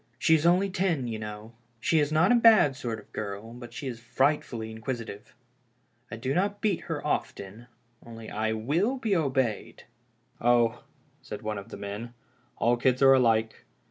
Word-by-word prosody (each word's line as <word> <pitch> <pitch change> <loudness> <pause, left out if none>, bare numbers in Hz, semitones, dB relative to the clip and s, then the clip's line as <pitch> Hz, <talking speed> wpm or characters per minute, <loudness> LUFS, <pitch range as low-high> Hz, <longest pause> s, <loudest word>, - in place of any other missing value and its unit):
She 160 - +3
is 160 +1 +3
only 185 +3 +3
ten, 180 -8 0
you 110 -2 -4
know. 105 +1 -8 0.3
She 160 +7 +2
is 145 0 +1
not 160 +6 +4
a - - +6
bad 225 - +6
sort 120 -5 -4
of 105 - -15
a - - -37
girl, 105 +2 -6
but 120 0 -10
she 160 -4 -7
is 120 -3 -5
frightfully 120 -2 -1
inquisitive. 110 -2 -6 0.7
I 110 - -6
do 130 +4 -2
not 200 +5 0
beat 205 -5 0
her - - -4
often, 105 +5 -3 0.4
only 115 -1 -10
I 110 +1 -1
will 160 - 0
be 220 -6 0
obeyed." 130 - -1 0.3
" - - -34
Oh," 120 0 +2 0.4
said - - -8
one 105 -1 -3
of 100 - -12
the - - -8
men, 105 +4 -7 0.2
" 120 -1 -38
all 120 +1 +2
kids 130 +2 +2
are 135 0 +8
alike. 115 -4 +2
120 Hz, 185 wpm, -27 LUFS, 110-155 Hz, 0.7 s, are